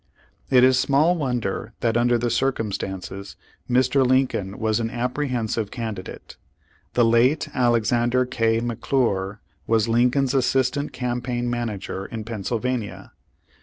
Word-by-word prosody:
It 125 -2 +5
is 130 0 +5
small 145 +6 +3
wonder 120 - -2
that 115 -1 +1
under 120 0 +3
the 120 0 -1
circumstances 100 -6 -3 0.3
Mr. 130 +2 +3
Lincoln 125 -7 +1
was 110 0 0
an 115 -1 -1
apprehensive 120 -3 -2
candidate. 110 -6 -7 0.6
The 120 - +4
late 120 +6 +3
Alexander 120 0 +2
K. 115 -2 +1
McClure 115 -4 -1 0.3
was 110 -1 +2
Lincoln's 125 +3 +2
assistant 135 +2 +1
campaign 120 -1 -2
m.anager 105 -5 -4
in 110 -1 -5
Pennsylvania. 115 +1 -3
120 Hz, 115 wpm, -23 LUFS, 110-125 Hz, 0.6 s, It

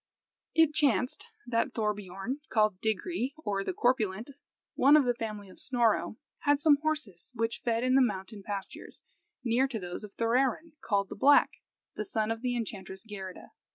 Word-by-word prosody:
It 320 -2 +5
chanced 255 - +1 0.2
that 230 -1 0
Thorbiorn, 210 +2 -3
called 215 -4 +2
Digri 245 - -1
(or 200 -10 -2
the - - -2
corpulent), 240 - 0 0.4
one 285 +3 +6
of 290 - +3
the 245 - +2
family 215 -3 -5
of 185 - -13
Snorro, 235 -4 +1 0.2
had 290 -1 +2
some 300 -1 +5
horses 295 - -3
which 230 0 -1
fed 230 0 +1
in 255 0 +2
the 270 - +6
mountain 205 -2 -2
pastures, 200 -1 -7 0.4
near 250 +2 +2
to 255 -4 -4
those 180 +1 -6
of 205 -2 -10
Thorarin, 255 +7 +1
called 200 -2 0
the - - -6
Black, 285 +7 +5 0.4
the 215 - -3
son 215 +1 -1
of 225 0 -3
the 250 -1 -1
enchantress 195 -4 -5
Geirrida. 195 -4 -8
230 Hz, 165 wpm, -30 LUFS, 205-265 Hz, 0.4 s, one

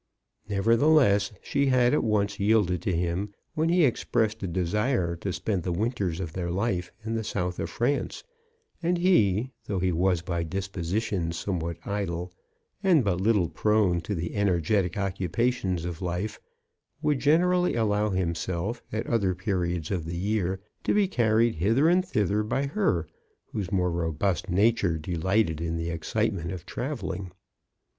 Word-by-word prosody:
Never 105 +3 +3
theless, 120 -7 +4
she 140 0 +1
had 125 -1 +4
at - - +2
once 100 -3 0
yielded 100 -4 +2
to 95 - 0
him 90 +4 -2 0.2
when 160 +1 +1
he 175 -2 +5
expressed 110 -3 0
a 95 - -2
desire 90 +1 0
to 95 +3 -3
spend 95 +1 -1
the 90 - -2
winters 95 -3 -1
of 85 -4 -4
their 90 -1 -3
life 90 -1 -1
in 115 - -2
the 110 -1 -1
South 90 -3 -2
of - - -2
France; 135 +5 -1 0.6
and 175 +1 +1
he, 130 - +3 0.2
though 100 - -1
he 90 0 +1
was 90 0 +1
by 85 0 -2
disposition 95 +1 -2
somewhat 85 -1 -3
idle, 90 -3 -3 0.5
and 180 -9 +4
but 95 -3 0
little 105 -4 +3
prone 105 -3 +2
to 100 +5 -3
the 85 0 -3
energetic 95 -1 +1
occupations 95 -1 -1
of 85 -1 -5
life, 90 +4 -3 0.6
would 145 -3 +2
generally 180 +6 +3
allow 105 -2 +1
himself, 95 +4 -2
at 110 +1 -2
other 100 -6 +1
periods 90 -3 -2
of 90 -5 -1
the 85 +1 -4
year, 95 -1 0 0.2
to - - +1
be 205 -2 +4
carried 115 - +2
hither 115 - +3
and 180 +2 +4
thither 105 - +1
by 130 +6 -1
her, 140 - 0 0.5
whose 100 -3 -3
more 90 -3 +1
robust 85 +2 -1
nature 100 -2 +2
de 80 +3 -5
lighted 85 -1 +1
in 85 0 -2
the 85 +1 -2
excitement 85 +1 -1
of 90 -4 -7
travelling. 95 -9 -4
100 Hz, 160 wpm, -27 LUFS, 90-115 Hz, 0.6 s, he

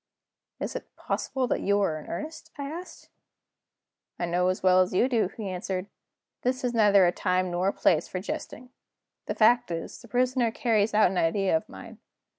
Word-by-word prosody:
"Is - - -4
it - - -8
possible 265 -1 -2
that - - -1
you 200 +1 +2
are 160 -6 0
in - - -12
earnest?" 310 - -6
I 285 - -4
asked. 330 +6 -8 1.1
"I 175 - -1
know 175 +1 +1
as 185 0 -1
well 185 0 +6
as 185 0 0
you 240 - +4
do," 235 -7 +1
he 215 -3 -4
answered, 185 0 -3
"that - - -36 0.5
this 255 +1 -1
is 245 -1 0
neither 205 -4 +5
a 175 - +3
time 185 0 0
nor 175 +2 0
a - - +3
place 165 -1 +2
for 185 - -4
jesting. 245 +5 -6 0.6
The - - -2
fact 235 0 +4
is, 165 -1 -5
the - - -14
Prisoner 250 -1 +1
carries 225 -2 +1
out 215 -4 +5
an 185 - 0
idea 185 +2 +2
of 160 - -2
mine. 230 -3 -11
200 Hz, 200 wpm, -27 LUFS, 185-245 Hz, 1.1 s, well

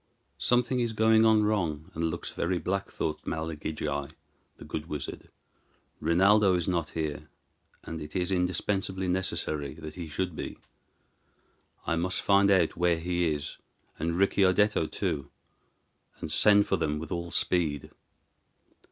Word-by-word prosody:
"Something 125 +1 +2
is 120 -2 0
going 110 0 +4
on 110 -1 +5
wrong, 85 -8 -1
and 80 +1 -1
looks 85 +1 -4
very 90 +1 -1
black," 95 +3 -2
thought 75 -1 -3
Malagigi, 80 -3 -3 0.5
the - - -11
good 80 0 -5
wizard; 75 -4 -6 0.7
"Rinaldo 95 +4 +4
is 85 -2 -1
not 85 -4 0
here, 75 -1 -3 0.5
and 80 -1 -6
it 75 0 -9
is 90 0 0
indispensably 95 +1 0
necessary 90 -6 -1
that 80 -2 -8
he 85 -2 -7
should 90 +2 -3
be. - - -6 1.3
I 80 - 0
must 90 +2 -1
find 100 0 +4
out 95 -5 +3
where 85 -1 +2
he 85 0 0
is, 75 0 -4 0.4
and 85 +2 -1
Ricciardetto 95 -1 +3
too, 70 -1 -2 0.9
and - - -5
send 105 +3 +5
for 95 - +1
them 75 -2 -1
with 80 0 -7
all 85 -1 -3
speed." 80 -5 0
85 Hz, 140 wpm, -28 LUFS, 80-95 Hz, 1.3 s, on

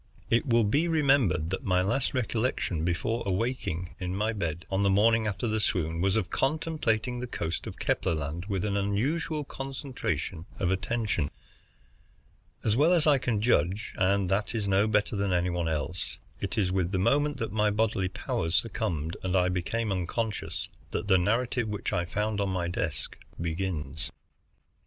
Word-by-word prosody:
It 115 +4 +3
will 115 -2 +4
be 145 +11 +2
remembered 135 - +3
that 95 - -2
my 90 -1 +2
last 135 +8 0
recollection 115 -8 0
before 90 +7 0
awaking 95 -4 -2
in 90 0 -3
my 105 +3 0
bed, 85 -4 -3
on 95 +1 +1
the 100 - +3
morning 110 +3 +4
after 105 +4 -2
the 110 0 +1
swoon, 85 -5 0
was 95 +1 +2
of 95 -5 -1
contemplating 135 -6 0
the 125 - -4
coast 105 -7 -3
of - - -7
Kepler 85 - +1
Land 80 +4 -4
with 100 -2 -1
an 100 -1 0
unusual 135 +11 0
concentration 130 - -4
of 90 -1 +1
attention. 95 -6 0 1.3
As 110 -1 +2
well 155 +7 +5
as 170 -3 +3
I 145 -3 +5
can 115 -5 0
judge, 100 -2 +1
and 95 +1 +2
that 100 +4 0
is 105 -3 -1
no 100 +2 +3
better 105 0 +1
than 100 -1 0
any 90 0 +2
one 85 -1 -1
else, 80 +3 -2 0.2
it - - -3
is 95 -4 +2
with 95 -1 0
the 95 - +1
moment 145 +9 +2
that 115 - -3
my 105 0 +2
bodily 105 -3 +1
powers 80 -2 -2
succumbed 80 -1 -1
and 95 0 -1
I 90 -1 +4
became 105 +5 -1
unconscious 100 +4 -2 0.2
that 105 - -3
the 95 -1 +6
narrative 115 +5 +1
which 105 -1 -3
I 85 - +1
found 105 +3 -1
on 100 - 0
my 90 -2 -1
desk 80 -6 -3 0.2
begins. 80 -3 -2
100 Hz, 175 wpm, -29 LUFS, 90-115 Hz, 1.3 s, the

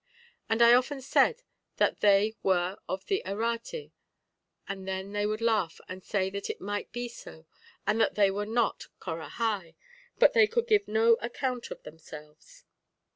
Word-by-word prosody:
And 225 +1 +4
I 235 0 +8
often 255 +3 +2
said 455 - +2 0.3
that - - +2
they 205 +1 +4
were 185 0 +1
of 190 0 -3
the 390 - 0
Errate, 230 - -3 0.8
and 190 -1 -6
then 190 +1 -4
they 205 0 0
would 215 +1 -3
laugh 215 -8 +1
and 185 0 -8
say 190 -2 -1
that 200 0 -5
it - - -4
might 205 +1 -4
be 245 0 -4
so, 160 -8 -12 0.4
and 225 - +2
that - - +2
they 200 -2 +4
were 205 +1 -3
not 230 +1 0
Corahai, 175 +1 -3 0.4
but - - +6
they 455 -3 +6
could 465 +1 0
give 425 -3 +3
no 225 +1 +4
account 245 +1 -3
of - - -9
themselves. 155 - -13
215 Hz, 165 wpm, -29 LUFS, 190-245 Hz, 0.8 s, I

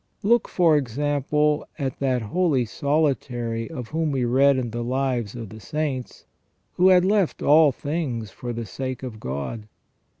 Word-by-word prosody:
Look, 235 +3 +3
for 165 -4 +3
example, 145 +3 0
at 135 -3 -3
that 130 -3 0
holy 140 - +1
solitary 125 -4 -1
of 125 -8 -7
whom 160 -1 -1
we 130 -3 0
read 135 +3 +4
in 120 -3 -2
the 120 +1 -3
Lives 125 -3 -1
of 115 -4 -7
the 110 - -10
Saints, 140 +1 -4 0.5
who 180 - +4
had 180 -1 +6
left 200 -3 +1
all 150 0 +6
things 130 - -3
for 120 - -6
the 115 -1 -4
sake 130 +6 -5
of 115 -4 -7
God. 70 - -5
135 Hz, 160 wpm, -24 LUFS, 120-150 Hz, 0.5 s, had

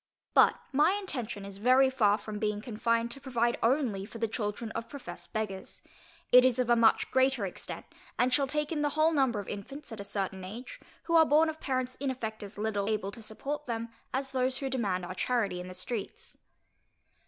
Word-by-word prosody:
But - - +6 0.2
my 300 +7 +5
intention 250 - -4
is 200 0 -8
very 260 +4 +5
far 210 -5 +3
from 210 0 -6
being 210 -1 0
confined 230 +1 0
to 275 - -4
provide 240 -3 0
only 230 -5 +2
for 220 +3 -9
the 225 0 0
children 220 0 -3
of 230 0 -5
professed 245 -12 -9
beggars: 210 -3 -4 0.5
it 250 0 +9
is 255 -1 +3
of 250 -2 +1
a - - +7
much 230 -1 +4
greater 260 -4 +3
extent, 185 - -7 0.3
and 250 +1 +2
shall 275 +1 +3
take 300 +2 -1
in 305 -3 -1
the 295 - +2
whole 315 +1 +5
number 265 -8 +2
of 200 - -6
infants 270 +8 -7
at 220 - -6
a - - -4
certain 195 -2 -3
age, 240 - -8 0.2
who 335 - -2
are 325 -1 +8
born 315 +1 +4
of 315 0 -6
parents 255 -1 -2
in 275 0 -1
effect 225 -4 -4
as 205 0 -9
little 210 -1 -1
able 210 -2 -1
to 230 - -7
support 280 +7 -4
them, 230 -1 -3 0.2
as 265 +1 -2
those 255 0 +1
who 270 -1 -3
demand 195 -8 0
our 185 - -5
charity 205 -2 0
in 180 - -6
the 185 - -8
streets. 200 +3 -6
235 Hz, 210 wpm, -30 LUFS, 210-265 Hz, 0.5 s, it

